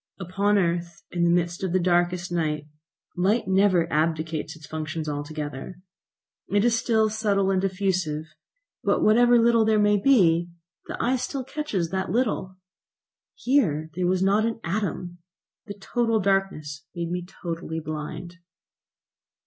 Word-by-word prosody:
Upon 195 +3 +1
earth, 170 -2 -1
in 175 -1 0
the - - +3
midst 175 0 +1
of 185 -2 -1
the 185 - +3
darkest 175 0 +1
night, 155 -3 -1 0.5
light 195 +6 +1
never 190 -3 +3
abdicates 155 0 -1
its 155 -1 -13
functions 155 0 -5
altogether. 145 +2 -5 0.7
It 205 +2 +2
is 240 -1 +3
still 225 -1 +2
subtle 205 -3 +1
and 190 -1 +1
diffusive, 185 -5 -1 0.6
but - - +1
whatever 240 +3 +5
little 230 -1 +4
there 220 0 +3
may 205 0 +4
be, 175 -9 +4 0.4
the - - -5
eye 255 +2 +1
still 265 +1 -4
catches 245 - -3
that 190 0 -2
little. 210 -5 -1 0.8
Here 160 - +1
there 180 +1 -1
was 185 +1 +1
not 200 +3 +3
an 225 0 -1
atom; 180 -1 -3 0.5
the 200 - -6
total 230 +2 0
darkness 190 -7 -1
made 170 -1 -3
me 180 0 -2
totally 170 -3 -5
blind. 155 +3 -6
185 Hz, 140 wpm, -25 LUFS, 165-210 Hz, 0.8 s, whatever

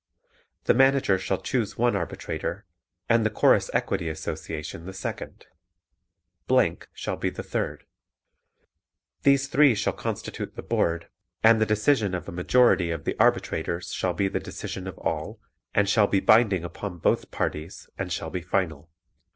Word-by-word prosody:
The - - +4
Manager 135 -6 +4
shall 95 0 -1
choose 110 -1 -1
one 120 +1 +2
arbitrator, - - -4 0.4
and 115 -1 +4
the 110 - +2
Chorus 105 - +3
Equity 90 -4 -1
Association 80 +1 -6
the 95 - -6
second. 95 - -6 1.5
shall - - -3
be - - -1
the - - -7
third. - - -3 1.4
These 140 0 +4
three 140 -3 +5
shall - - 0
constitute - - -5
the - - -7
Board 85 0 0 0.4
and 110 0 +6
the 110 - +3
decision 105 -2 +2
of 90 - -6
a - - -5
majority 90 0 +3
of 80 -3 -3
the - - -2
arbitrators 85 +3 +1
shall 90 -2 -1
be 100 - +1
the - - -2
decision 95 0 -6
of 95 - -7
all 85 +7 -3 0.4
and 100 -1 +3
shall 100 0 +4
be 100 - +2
binding 105 -5 +4
upon 90 +1 -6
both 80 - +1
parties 75 +4 -4
and 95 -2 -4
shall 80 -1 -3
be 90 - -3
final. 85 -3 -2
95 Hz, 150 wpm, -26 LUFS, 85-110 Hz, 1.5 s, and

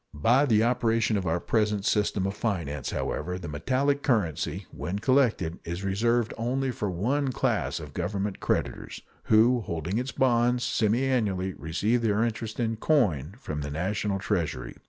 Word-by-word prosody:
By 125 - +3
the 110 -3 +4
operation 115 -2 +2
of 95 -3 -1
our 85 +2 +1
present 105 0 0
system 105 -3 +1
of 100 +1 -2
finance 80 - -2
however, 90 0 -3
the 90 - -7
metallic 135 - 0
currency, 105 - 0
when 90 +3 -4
collected, 110 -8 +1
is 85 +3 -5
reserved 115 +4 +1
only 130 +3 0
for 105 -4 -3
one 130 +10 0
class - - 0
of 75 -3 -9
Government 95 +4 -2
creditors, - - -2 0.2
who, 115 +3 +5
holding 85 +2 -2
its 130 +2 -3
bonds, 120 -1 +2
semiannually 110 -5 +1
receive 105 +9 0
their 110 -1 +2
interest 115 -1 -3
in 115 -2 0
coin 100 - +1
from 75 - -4
the 70 - -4
National 95 +6 -1
Treasury. 85 - -2
105 Hz, 155 wpm, -27 LUFS, 90-120 Hz, 0.2 s, who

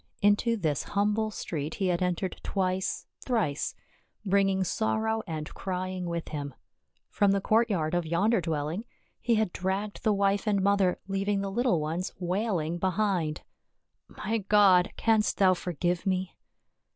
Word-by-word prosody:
Into 205 +3 +3
this 155 - 0
humble 210 +2 0
street 160 -7 -4
he 195 - -1
had 175 0 0
entered 180 +1 -1
twice, 190 0 -1 0.2
thrice, 215 - -1 0.5
bringing 195 -1 +2
sorrow 220 +3 0
and 155 -2 -5
crying 185 -1 -3
with 170 -1 -3
him; 145 -3 -5 0.6
from 205 -1 +3
the 200 - +2
courtyard 200 -7 +1
of 175 -2 0
yonder 195 +6 +2
dwelling 160 +4 -2 0.4
he 235 -1 +2
had 215 -4 0
dragged 195 +3 -2
the 220 - +3
wife 200 +1 +1
and 205 -2 +3
mother, 200 -2 +3
leaving 195 +1 0
the 195 0 -3
little 235 -4 +2
ones 160 +4 -3
wailing 180 -3 -1
behind. 185 -4 0 0.4
" - - -53 0.2
My 225 +2 +1
God! 195 -3 +5
Canst 220 -2 +2
thou 190 -2 +5
forgive 175 0 -2
me 185 -1 -1
190 Hz, 145 wpm, -28 LUFS, 175-205 Hz, 0.6 s, God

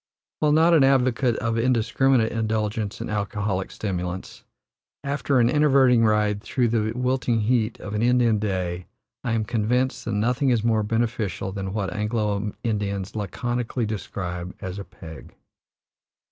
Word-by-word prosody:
While 150 -1 +3
not 165 +2 +5
an 155 -4 +6
advocate 130 -2 +3
of 115 0 -1
indiscriminate 125 0 +2
indulgence 110 -2 -2
in - - -4
alcoholic 100 -2 -2
stimulants, 90 -2 -5 0.6
after 140 -1 0
an 120 - +4
enervating 130 -4 +4
ride 105 -1 +2
through 120 +1 0
the 110 -1 0
wilting 125 -2 0
heat 115 0 +1
of 105 - -7
an 105 - -1
Indian 120 -2 +3
day 90 -4 -2 0.4
I 120 - -1
am 110 -2 0
convinced 120 +3 0
that 115 - -2
nothing 125 +6 +1
is 120 -4 +2
more 115 -2 +2
beneficial 110 -4 -1
than 95 -1 -4
what 100 -2 -2
Anglo 105 -1 -1
Indians 100 -4 -2
laconically 120 +4 -2
describe 90 -4 -5
as 95 +1 -5
a - - -5
"peg." 85 -4 -12
110 Hz, 145 wpm, -24 LUFS, 100-125 Hz, 0.6 s, an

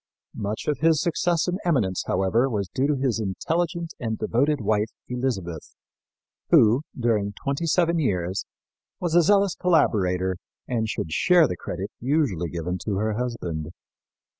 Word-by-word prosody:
Much 105 +2 -4
of 150 -3 0
his 160 -1 +4
success 170 +1 +1
and 180 +2 -1
eminence, 120 - +1
however, 95 +8 +2
was 100 -5 -2
due 135 +2 +1
to 150 - +1
his 130 -4 0
intelligent 165 - -2
and 110 -2 -2
devoted 140 +5 +1
wife, 105 0 +1 0.2
Elizabeth, 115 - -3 0.7
who, 115 +5 +5 0.2
during 105 -4 +1
twenty 140 +9 -3
seven 170 0 +2
years, 95 - -1 0.5
was 175 -3 -2
a 175 - +7
zealous 200 +2 +3
collaborator 95 - +1 0.3
and 115 -3 -1
should 80 - -3
share 175 - +5
the - - -3
credit - - -5
usually 120 - 0
given 85 +2 -3
to 100 +3 -3
her 110 +2 0
husband. 105 -10 -3
120 Hz, 145 wpm, -25 LUFS, 95-160 Hz, 0.7 s, a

